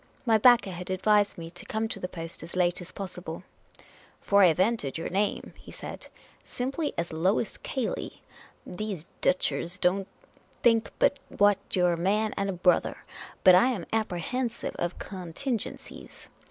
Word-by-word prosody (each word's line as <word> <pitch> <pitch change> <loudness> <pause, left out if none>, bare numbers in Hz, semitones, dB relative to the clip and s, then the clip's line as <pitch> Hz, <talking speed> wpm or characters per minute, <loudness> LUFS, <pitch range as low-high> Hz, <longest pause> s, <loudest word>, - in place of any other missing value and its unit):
My 225 -2 +4
backer 240 -3 +6
had 180 +1 -7
advised 205 +2 +2
me 165 -1 -7
to 175 - -7
come 225 -3 -1
to - - -1
the 180 - -3
post 165 -2 -8
as 165 +2 -9
late 180 0 +1
as 180 - -9
possible, 180 -3 -7 0.4
" - - -25 0.3
For 200 0 +3
I 185 - +8
have 165 0 +2
entered 190 - +1
your 165 - -4
name," 200 +3 -1
he - - -13
said, - - -8 0.2
" - - -28
simply 275 +5 -3
as 170 -1 -2
Lois 185 +6 0
Cayley. 260 -4 -4 0.4
These 190 -3 -5 0.2
Deutschers 180 -1 0
don't 190 +2 +1 0.6
think 230 -2 +4
but 280 - +3
what 205 -1 +3 0.2
you 180 -1 +3
're 175 - +3
a - - -2
man 210 +5 +1
and 200 0 -1
a - - -1
brother. 180 0 +2 0.5
But 185 - +9
I 185 +7 +6
am 220 -10 -2
apprehensive 225 +4 -2
of 175 0 -2
con 180 -4 -7
tingencies. 255 - -5
190 Hz, 175 wpm, -28 LUFS, 175-220 Hz, 0.6 s, But